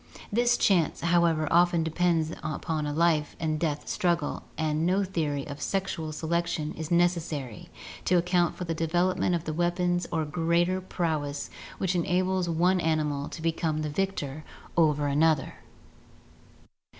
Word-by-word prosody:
This 240 +3 +3
chance, 175 -6 +2
however, 170 -2 +2
often 175 -1 +4
depends 165 -1 +1
upon 155 0 -3
a - - -2
life 155 -1 +1
and 155 -1 -1
death 150 -3 -2
struggle 170 -4 0 0.2
and 155 0 0
no 185 +4 +2
theory 155 -7 -2
of 145 0 -8
sexual 190 -4 -2
selection 160 0 -2
is 160 -1 -6
necessary 165 -8 0 0.4
to 180 - +3
account 175 0 +2
for - - -5
the 165 -2 -2
development 175 +3 +1
of 165 - -3
the 155 - -3
weapons 175 +1 0
or 160 -2 0
greater 170 +4 +1
prowess 155 -6 -2 0.3
which 190 -1 0
enables 180 +1 +1
one 175 +3 +2
animal 150 -3 0
to 160 - -8
become 160 -2 0
the 150 - -2
victor 155 -5 -2 0.3
over 150 -3 +3
another. 150 +1 +2
165 Hz, 140 wpm, -27 LUFS, 155-175 Hz, 0.4 s, often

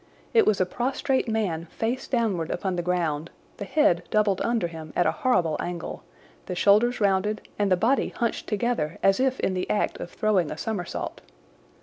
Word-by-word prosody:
It 455 - +5
was 210 -3 +3
a 185 - +3
prostrate 260 +6 -1
man 190 -7 -1
face 230 +9 -3
downward 210 -10 0
upon 185 0 -2
the 175 - -1
ground, 170 -3 -1 0.3
the 200 - -5
head 195 - +3
doubled 210 -3 +2
under 235 -6 +1
him 160 -2 -9
at 175 - +3
a - - +3
horrible 185 - +1
angle, 175 -1 -5 0.5
the 180 - -3
shoulders 215 +7 +4
rounded 205 +1 +1
and 200 -2 +1
the 185 - +5
body 240 +9 +2
hunched 235 -2 -2
together 210 -8 -1
as 195 +3 +4
if 260 0 +1
in 190 - +1
the 185 0 -3
act 210 - 0
of - - -6
throwing 195 -7 +1
a 155 - -5
somersault. 200 -1 -4
200 Hz, 185 wpm, -26 LUFS, 175-230 Hz, 0.5 s, It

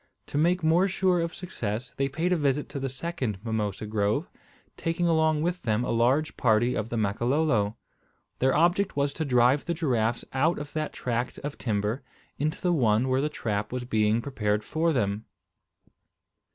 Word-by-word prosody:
To - - -4
make 175 +2 +2
more 170 +4 +4
sure 185 -1 +2
of 165 0 -2
success 120 - -4
they 135 0 0
paid 165 +6 0
a - - +3
visit 145 -2 0
to 140 - -5
the 135 0 -2
second 130 - -3
mimosa 110 -2 -2
grove, 105 - 0 0.4
taking 165 +1 -1
along 160 -2 +2
with 175 +1 -1
them 110 0 0
a - - -1
large 125 +7 +2
party 120 +1 +3
of 110 -1 -2
the 120 - -2
Makololo. 115 +1 +1 0.6
Their 130 +2 +3
object 175 +4 +2
was 140 0 +1
to 160 - -3
drive 125 +1 +3
the 170 - -1
giraffes 120 -8 0
out 155 +6 +2
of 145 0 -7
that 155 -1 -2
tract 120 0 -2
of 145 0 -5
timber 110 +2 -1 0.4
into 155 +2 -1
the 180 -1 +1
one 120 -3 +2
where 130 +1 +2
the 150 - 0
trap 105 -7 -3
was 125 0 -3
being 110 -1 +2
prepared 105 -6 -1
for 160 +7 0
them. 105 -6 -1
130 Hz, 180 wpm, -27 LUFS, 110-160 Hz, 0.6 s, more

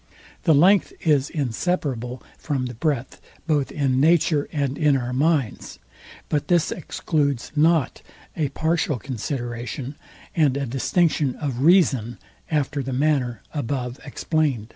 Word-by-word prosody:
The 160 -4 +5
length 185 +7 +4
is 145 -4 +2
inseparable 130 -3 -2 0.2
from 135 -4 -2
the 125 - -5
breadth 135 0 -2 0.2
both 150 -4 0
in 135 -3 +1
nature 155 -1 +3
and 140 -3 -1
in 150 -2 +3
our 125 -1 -3
minds; 140 -3 0 0.5
but 150 -2 -1
this 175 -2 +2
excludes 140 -6 -1
not 155 -2 +2 0.3
a 150 -3 0
partial 160 -1 0
consideration, 120 +1 -5 0.4
and 145 -5 +3
a 140 - -1
distinction 135 +2 +1
of 135 -5 -4
reason, 135 - +3 0.3
after 145 -2 0
the 135 0 -4
manner 130 -5 0
above 125 -3 -3
explained. 140 -6 -1
140 Hz, 125 wpm, -23 LUFS, 125-155 Hz, 0.5 s, The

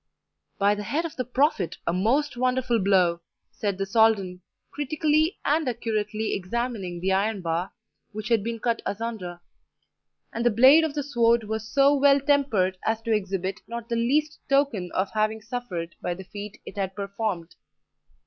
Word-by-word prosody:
"By 200 +1 +3
the 210 - -4
head 295 - -1
of 330 - -6
the 255 - -2
Prophet, 250 - 0
a 170 - 0
most 245 +11 +1
wonderful 250 -1 +1
blow!" 185 -3 +3 0.3
said 200 -3 -2
the 195 - -1
Soldan, 195 -3 +2 0.3
critically 310 +3 +1
and 300 -1 +2
accurately 220 -2 -2
examining 195 -2 -3
the 190 +2 0
iron 200 +1 +1
bar 170 +3 -1 0.4
which 215 +1 -6
had 225 -4 +3
been 230 +1 -3
cut 230 0 -1
asunder; 200 -5 -4 0.9
and 230 - -2
the 240 - +5
blade 260 +8 +7
of 310 -2 -2
the 290 - -1
sword 235 -4 +2
was 220 +1 -4
so 280 +1 +5
well 280 0 +5
tempered 265 -11 +1
as 220 0 0
to 230 - 0
exhibit 195 -2 -2
not 235 0 -6
the 235 - 0
least 290 +7 +1
token 275 -10 +1
of 190 +1 0
having 215 0 0
suffered 210 -7 -5
by 175 - -2
the 190 - -9
feat 205 +2 -9
it - - -10
had 190 -1 -2
performed. 200 -4 -3
220 Hz, 170 wpm, -25 LUFS, 195-255 Hz, 0.9 s, blade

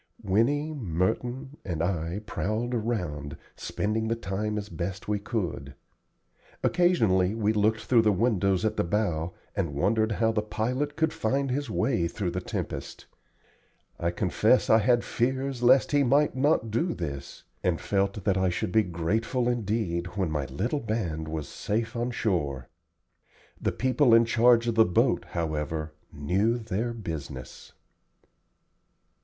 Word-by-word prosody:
Winnie, 140 +11 +1
Merton, 120 - -2
and 85 -3 -2
I 85 +1 -2
prowled 110 +4 -2
around, 90 - -3 0.2
spending 110 +2 -2
the 115 - +1
time 105 0 -3
as 105 -1 -4
best 90 +2 -5
we 105 -1 0
could. 90 - -4 0.9
Occasionally 110 - +3
we 110 -1 +1
looked 110 +1 +2
through 120 -3 +4
the 110 -1 +3
windows 100 -2 +1
at 110 0 0
the - - +2
bow, 85 -3 -1 0.2
and 85 -8 -2
wondered 110 +8 +2
how 115 +1 +2
the 110 -1 0
pilot 125 +7 -2
could 160 0 +1
find 135 +4 0
his 140 0 -2
way 110 -6 +1
through 90 0 -3
the 90 +1 -3
tempest. - - -5 0.9
I 85 - +1
confess 105 +8 +2
I 110 - +7
had 120 +2 +3
fears 130 +1 -1
lest 130 +2 +5
he 145 -1 +4
might 140 +3 +3
not 130 -4 +2
do 165 +11 0
this, 70 -5 -6 0.2
and 85 -3 +1
felt 100 0 -1
that 95 -1 +2
I 95 0 +2
should 90 0 -2
be 110 - +5
grateful 105 +8 -1
indeed 105 -7 -1
when 95 -5 0
my 75 -3 -1
little 105 - -2
band 95 - -2
was 80 -1 -4
safe 115 +3 -3
on 120 +1 -1
shore. 75 - -1 0.9
The - - +1
people 130 -1 +3
in 115 0 +6
charge 115 +1 +4
of 115 - +1
the 110 0 +6
boat, 90 -4 +2
however, 80 -1 -2 0.2
knew 95 +11 +1
their 115 +1 -2
business. 75 - -7
105 Hz, 150 wpm, -27 LUFS, 90-120 Hz, 0.9 s, I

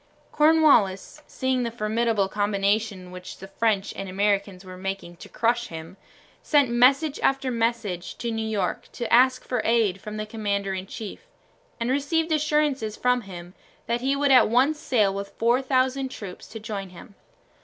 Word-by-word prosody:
Cornwallis, 300 -8 +3
seeing 260 -1 -1
the 235 - -1
formidable 220 -2 0
combination 200 -1 -1
which 180 0 -9
the 195 - -10
French 210 -1 0
and 195 -1 -6
Americans 200 -1 -1
were 185 0 -9
making 195 -2 -5
to - - -12
crush 235 +1 0
him, 165 +2 -9 0.5
sent 285 -5 +3
message 270 +5 +3
after 270 -1 +1
message 225 -6 -2
to 235 - -3
New 225 0 -2
York 205 -4 -2
to 235 -1 -3
ask 255 +1 +5
for 250 - -1
aid 220 -5 +1
from 210 0 -7
the 215 - -3
commander 200 -3 -2
in 190 0 -5
chief, 225 - -8 0.5
and 235 +2 -1
received 320 +4 0
assurances 300 -7 0
from 250 0 +2
him 180 -3 -10 0.3
that 235 +1 -1
he 270 +2 +1
would 285 0 +2
at 255 -4 +6
once 270 +6 +2
sail 210 -9 +1
with 200 0 -6
4000 260 +2 +1
troops 200 -7 -9
to 225 - -9
join 205 -3 -5
him. 180 +3 -13
225 Hz, 165 wpm, -25 LUFS, 195-255 Hz, 0.5 s, at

